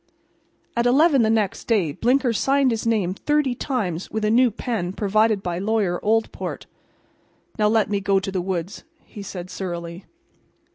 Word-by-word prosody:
At 235 +1 +2
eleven 280 +2 +4
the 220 - +2
next 215 -3 0
day 200 -10 +2
Blinker 245 - +1
signed 270 +3 +2
his 225 0 -2
name 205 -6 +1
thirty 295 +4 0
times 205 - -3
with 220 -1 -2
a 210 - +2
new 245 +2 +5
pen 205 -5 -3
provided 215 0 +1
by 175 -1 -3
Lawyer 200 -3 0
Oldport. 225 +1 -1 0.9
"Now 210 - +4
let 220 -1 +2
me 200 -1 -1
go 195 0 +2
to 195 +1 -5
the 185 -1 -1
woods," 180 0 -4 0.2
he 210 - -10
said 185 -2 -7
surlily. 175 -1 -6
210 Hz, 160 wpm, -22 LUFS, 185-235 Hz, 0.9 s, new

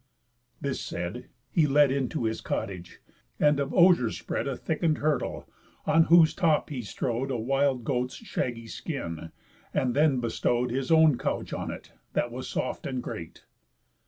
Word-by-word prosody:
This 140 -1 -3
said, 90 +9 -5 0.2
he 160 -3 +3
led 145 -1 +5
Into 135 0 -1
his 110 0 -1
cottage, 90 -3 -4 0.4
and 150 -1 +4
of 140 0 -1
osiers 170 - +4
spread - - -3
A 135 -3 -2
thicken'd 160 -1 0
hurdle, 150 0 -1 0.4
on 160 +1 +5
whose 165 -2 +6
top 160 -4 +1
he 130 -4 -3
strow'd 120 +4 -2
A 130 - -1
wild 135 +2 +1
goat's 125 +1 -1
shaggy 120 - -4
skin, 85 - -5 0.4
and 125 -1 +1
then 145 -3 +4
bestow'd 120 +1 0
His 130 +1 -2
own 160 -4 +5
couch - - -2
on - - -3
it, - - -8 0.2
that 120 - 0
was 130 +2 -6
soft 130 - -3
and 130 -2 -3
great. 80 -1 -8
135 Hz, 160 wpm, -27 LUFS, 120-150 Hz, 0.4 s, whose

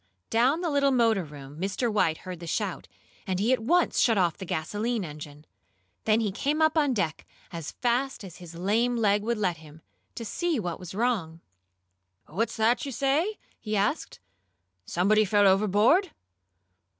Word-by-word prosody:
Down 245 +5 +3
in 335 - -6
the 340 -3 -1
little 280 -1 +3
motor 230 -6 +3
room 145 -1 -11
Mr. 205 +4 -1
White 160 -6 +2
heard 180 -2 -6
the 170 - -8
shout, 195 +1 -3 0.4
and 185 -1 -1
he 225 +6 +3
at 255 - +1
once 345 +10 +2
shut 225 -3 +4
off 175 -4 +2
the 190 - -8
gasoline 210 +7 -2
engine. 150 -1 -10 0.6
Then 220 +1 +3
he 210 -3 0
came 290 +10 -1
up 315 0 +3
on 290 -5 +2
deck 165 -7 -2 0.3
as 165 -3 -6
fast 250 0 -1
as 180 -4 -10
his 170 -2 -11
lame 220 +8 +1
leg 205 -2 +2
would 235 +2 -1
let 185 -5 0
him, 155 0 -15 0.3
to 230 - -6
see 335 +5 -1
what 175 -5 -4
was 180 0 -9
wrong. 200 -9 -1 0.9
"What's 220 +10 -2
that 225 +2 +2
you 280 - -4
say?" 290 - 0 0.2
he 215 -1 -2
asked. 205 +10 -1 0.7
"Somebody 210 +5 +3
fell 205 0 +3
overboard?" 210 - +4
210 Hz, 175 wpm, -27 LUFS, 180-245 Hz, 0.9 s, shut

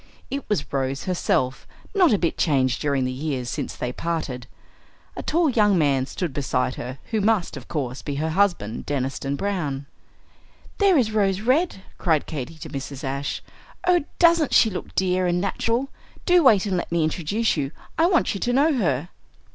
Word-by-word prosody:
It 280 0 -4
was 150 -9 -1
Rose 135 0 -1
herself, 135 -7 0 0.3
not 365 -7 +5
a 210 - +4
bit 170 -3 0
changed 130 -5 +1
during 140 -3 +1
the 130 - -1
years 130 -2 -3
since - - -4
they 125 0 -3
parted. 150 -7 -3 0.7
A - - -4
tall 335 +1 +2
young 210 -7 +3
man 140 -4 +2
stood 165 +1 -4
beside 130 -2 0
her, 125 +2 -6
who 220 -2 +1
must, 210 -3 +1
of - - -9
course, 135 -5 -3
be 145 - -4
her 155 +3 -1
husband, 175 - 0
Deniston 135 0 -2
Browne. 150 -7 -2 0.9
"There 395 -4 +5
is 230 -5 +2
Rose 200 -3 +1
Red," 255 - +1 0.2
cried 160 -4 +2
Katy 155 0 -5
to - - -8
Mrs. 135 0 -6
Ashe. 140 +1 -3 0.4
"Oh, 355 -3 +4
doesn't 335 -4 +4
she 220 - +6
look 180 - -7
dear 185 -1 +2
and 175 0 +1
natural? 230 +7 -1 0.4
Do 355 -1 +5
wait 215 -8 +5
and 190 -3 0
let 175 - -4
me 170 -1 +2
introduce 180 +8 0
you. 140 -4 -1 0.3
I 330 - +4
want 350 -3 +2
you 200 - -4
to 245 - 0
know 295 +5 +4
her." 170 - 0
170 Hz, 180 wpm, -24 LUFS, 140-220 Hz, 0.9 s, she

